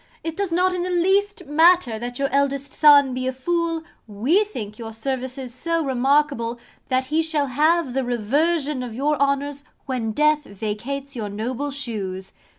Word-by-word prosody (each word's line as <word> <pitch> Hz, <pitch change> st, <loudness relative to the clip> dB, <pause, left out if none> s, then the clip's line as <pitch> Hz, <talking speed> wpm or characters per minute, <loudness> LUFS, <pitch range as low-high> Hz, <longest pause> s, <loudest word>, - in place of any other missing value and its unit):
It 325 Hz, -1 st, -4 dB
does 395 Hz, -1 st, -2 dB
not 365 Hz, +2 st, +2 dB
in 360 Hz, -, -2 dB
the 360 Hz, -, -2 dB
least 385 Hz, +2 st, +1 dB
matter 315 Hz, -6 st, +4 dB
that 245 Hz, +1 st, -5 dB
your 275 Hz, -, +1 dB
eldest 280 Hz, 0 st, 0 dB
son 285 Hz, -3 st, +6 dB
be 255 Hz, 0 st, -2 dB
a -, -, +1 dB
fool: 330 Hz, +4 st, -1 dB, 0.2 s
we 250 Hz, -, +2 dB
think 215 Hz, -, -7 dB
your 225 Hz, -1 st, -6 dB
services 260 Hz, +1 st, -4 dB
so 330 Hz, +4 st, -1 dB
remarkable, 265 Hz, -2 st, +1 dB, 0.3 s
that 260 Hz, 0 st, +1 dB
he 320 Hz, -, +4 dB
shall 315 Hz, -3 st, 0 dB
have 300 Hz, +2 st, +2 dB
the 265 Hz, 0 st, 0 dB
reversion 275 Hz, +5 st, 0 dB
of 240 Hz, -3 st, -6 dB
your 290 Hz, +4 st, +1 dB
honours 280 Hz, +1 st, 0 dB, 0.2 s
when 245 Hz, -4 st, -2 dB
death 300 Hz, +4 st, +2 dB
vacates 235 Hz, +8 st, -5 dB
your 215 Hz, -4 st, -4 dB
noble 240 Hz, +7 st, -3 dB
shoes. 205 Hz, -9 st, -4 dB
275 Hz, 165 wpm, -23 LUFS, 245-320 Hz, 0.3 s, son